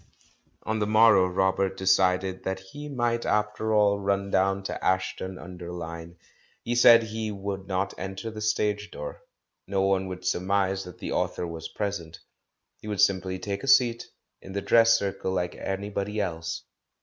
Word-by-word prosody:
On 110 Hz, 0 st, -1 dB
the 105 Hz, -, 0 dB
morrow 110 Hz, -3 st, +6 dB
Robert 95 Hz, +1 st, 0 dB
decided 95 Hz, 0 st, +2 dB
that 95 Hz, 0 st, -2 dB
he 145 Hz, +11 st, -9 dB
might, 120 Hz, -3 st, 0 dB
after 105 Hz, +1 st, 0 dB
all, 105 Hz, -1 st, +3 dB
run 100 Hz, 0 st, -1 dB
down 95 Hz, +1 st, +2 dB
to -, -, -5 dB
Ashton 95 Hz, 0 st, -1 dB
under 90 Hz, -1 st, -8 dB
Lyne. 85 Hz, -1 st, -7 dB, 0.5 s
He 120 Hz, -, -1 dB
said 120 Hz, -1 st, +7 dB
he 110 Hz, 0 st, -4 dB
would 95 Hz, -1 st, -5 dB
not 95 Hz, 0 st, -1 dB
enter 95 Hz, +4 st, -5 dB
the 110 Hz, 0 st, -7 dB
stage 105 Hz, -1 st, 0 dB
door, -, -, -7 dB, 0.5 s
no 95 Hz, -1 st, 0 dB
one 95 Hz, -1 st, +1 dB
should 90 Hz, 0 st, -7 dB
surmise 95 Hz, +1 st, 0 dB
that 90 Hz, -2 st, -10 dB
the -, -, -5 dB
author -, -, -1 dB
was 80 Hz, -1 st, -6 dB
present; 95 Hz, -6 st, -4 dB, 0.6 s
he -, -, -11 dB
would 105 Hz, -2 st, -3 dB
simply 95 Hz, -2 st, +2 dB
take 100 Hz, +1 st, -4 dB
a -, -, -5 dB
seat 120 Hz, -3 st, +4 dB, 0.3 s
in 95 Hz, -, -10 dB
the 100 Hz, -, -2 dB
dress 115 Hz, 0 st, +5 dB
circle 95 Hz, -2 st, -3 dB
like 90 Hz, -1 st, -1 dB
anybody 100 Hz, +2 st, -3 dB
else. 85 Hz, -4 st, -3 dB
95 Hz, 165 wpm, -27 LUFS, 95-105 Hz, 0.6 s, said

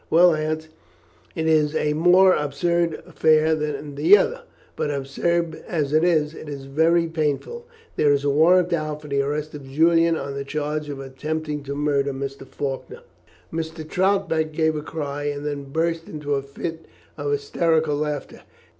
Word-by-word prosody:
"Well, 175 Hz, +1 st, +6 dB
Aunt, 155 Hz, 0 st, -2 dB, 0.7 s
it 160 Hz, -, -2 dB
is 155 Hz, -1 st, +3 dB
a 150 Hz, -1 st, +1 dB
more 180 Hz, +4 st, +5 dB
absurd 165 Hz, +3 st, 0 dB
affair 155 Hz, 0 st, +3 dB
than 150 Hz, -1 st, -3 dB
the 360 Hz, -, +6 dB
other; -, -, -1 dB, 0.3 s
but, -, -, -2 dB
absurd 160 Hz, +4 st, -1 dB
as 150 Hz, -4 st, -1 dB
it 155 Hz, +1 st, +4 dB
is, 155 Hz, -3 st, +2 dB
it 155 Hz, -, -9 dB
is 140 Hz, -2 st, -7 dB
very 165 Hz, +5 st, +2 dB
painful. 165 Hz, -, -2 dB, 0.3 s
There 145 Hz, -, +4 dB
is 140 Hz, -1 st, +2 dB
a 145 Hz, -, +1 dB
warrant 175 Hz, +4 st, +4 dB
out 155 Hz, -2 st, -2 dB
for -, -, -9 dB
the 140 Hz, -1 st, +1 dB
arrest 150 Hz, +2 st, -3 dB
of 140 Hz, -3 st, -9 dB
Julian 165 Hz, +3 st, +4 dB
on 140 Hz, -, -5 dB
the 140 Hz, 0 st, -4 dB
charge 150 Hz, +1 st, -3 dB
of 140 Hz, -1 st, -5 dB
attempting 150 Hz, +3 st, -4 dB
to 140 Hz, 0 st, -4 dB
murder 140 Hz, -1 st, 0 dB
Mr. 135 Hz, 0 st, -6 dB
Faulkner." 145 Hz, -, -5 dB, 0.5 s
Mrs. 160 Hz, -1 st, -5 dB
Troutbeck 185 Hz, -5 st, +1 dB
gave 160 Hz, 0 st, +1 dB
a 150 Hz, -, -3 dB
cry, 145 Hz, -2 st, -5 dB
and 145 Hz, 0 st, -3 dB
then 145 Hz, -1 st, -3 dB
burst 165 Hz, +3 st, -2 dB
into 150 Hz, -2 st, -3 dB
a 140 Hz, -, +1 dB
fit 160 Hz, +4 st, -7 dB, 0.3 s
of 435 Hz, -, -3 dB
hysterical 165 Hz, -, +1 dB
laughter. 150 Hz, 0 st, -4 dB
155 Hz, 170 wpm, -23 LUFS, 145-165 Hz, 0.7 s, Well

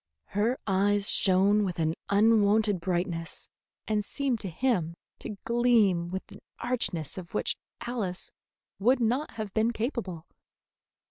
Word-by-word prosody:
Her 220 Hz, +6 st, +1 dB
eyes 200 Hz, +1 st, +3 dB
shone 200 Hz, +2 st, +4 dB
with 185 Hz, -3 st, -2 dB
an 160 Hz, -1 st, +1 dB, 0.2 s
unwonted 210 Hz, -1 st, +4 dB
brightness, 175 Hz, -1 st, -3 dB, 0.4 s
and 215 Hz, -1 st, +1 dB
seemed 265 Hz, +1 st, -2 dB
to 195 Hz, -, -4 dB
him 175 Hz, -5 st, 0 dB, 0.2 s
to 210 Hz, -, -6 dB
gleam 225 Hz, -8 st, +3 dB
with 190 Hz, +1 st, -6 dB
an -, -, -11 dB, 0.2 s
archness 195 Hz, -, -2 dB
of 175 Hz, +2 st, -10 dB
which -, -, +1 dB, 0.3 s
Alice 210 Hz, -7 st, -4 dB, 0.5 s
would 250 Hz, +7 st, +3 dB
not 250 Hz, +6 st, 0 dB
have 215 Hz, -3 st, -5 dB
been 220 Hz, +1 st, +2 dB
capable. 220 Hz, -, -3 dB
205 Hz, 130 wpm, -28 LUFS, 185-230 Hz, 0.5 s, shone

